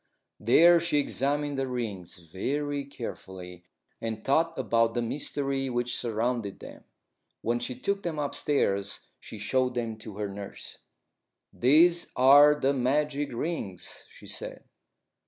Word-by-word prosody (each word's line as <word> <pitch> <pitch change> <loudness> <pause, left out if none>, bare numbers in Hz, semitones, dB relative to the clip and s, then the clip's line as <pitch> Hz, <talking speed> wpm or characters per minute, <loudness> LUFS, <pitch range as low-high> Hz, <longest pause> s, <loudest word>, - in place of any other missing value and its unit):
There 170 +10 +6
she 165 -2 0
examined 145 0 0
the 135 - -1
rings 110 -9 -5
very 140 - -3
carefully, 90 -9 -8 0.4
and 110 -1 -4
thought 165 +4 +2
about 115 0 +1
the 120 - +1
mystery 135 +1 -2
which 120 0 -1
surrounded 115 -2 -2
them. - - -12 0.6
When 120 +1 0
she 125 +1 -4
took 200 +10 -2
them 170 -4 -3
upstairs 140 -9 -1 0.2
she - - -9
showed 125 +5 0
them 115 -2 -3
to 110 -2 -10
her 105 -1 -2
nurse. 100 0 -8 0.7
"These 170 +7 +4
are 145 +3 +7
the 140 0 +2
magic 145 +2 0
rings," 120 - -5
she - - -16
said. - - -6
125 Hz, 130 wpm, -28 LUFS, 110-145 Hz, 0.7 s, are